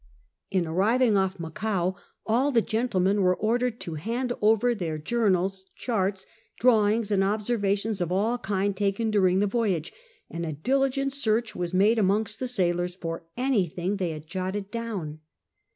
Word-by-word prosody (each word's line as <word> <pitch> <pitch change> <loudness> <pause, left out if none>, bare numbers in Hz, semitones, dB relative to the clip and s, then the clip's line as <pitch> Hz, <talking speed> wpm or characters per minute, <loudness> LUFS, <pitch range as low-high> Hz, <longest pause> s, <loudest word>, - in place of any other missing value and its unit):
On 185 -3 +1
arriving 215 +8 +2
off 190 -1 +1
Macao 185 +2 -2 0.3
all 250 +6 +2
the 230 -4 +3
gentlemen 205 -4 +1
were 180 -1 +3
ordered 240 +2 0
to 170 - -5
hand 245 +5 -2
over 225 +3 +4
their 170 -8 -3
journals, 190 0 0
charts, 195 -5 -1 0.3
drawings, 220 -2 +3
and 195 -1 +3
ob 210 +2 0
servations 205 -2 0
of 175 0 -1
all 220 +6 +1
kinds 200 -2 -1
taken 205 +2 0
during 190 -2 +3
the - - +3
voyage, 200 -7 -1 0.3
and 170 +1 -5
a 160 -2 -3
diligent 270 - 0
search 230 -4 0
was 175 -1 -3
made 210 +5 +4
amongst 210 +2 +1
the 255 - -2
sailors 180 -6 0
for 165 -2 -6
any 250 -7 +2
thing 180 +5 -3
they 185 -3 -1
had 155 -1 -7
jotted 190 +3 -4
down. 205 -10 -4
205 Hz, 160 wpm, -26 LUFS, 185-230 Hz, 0.3 s, over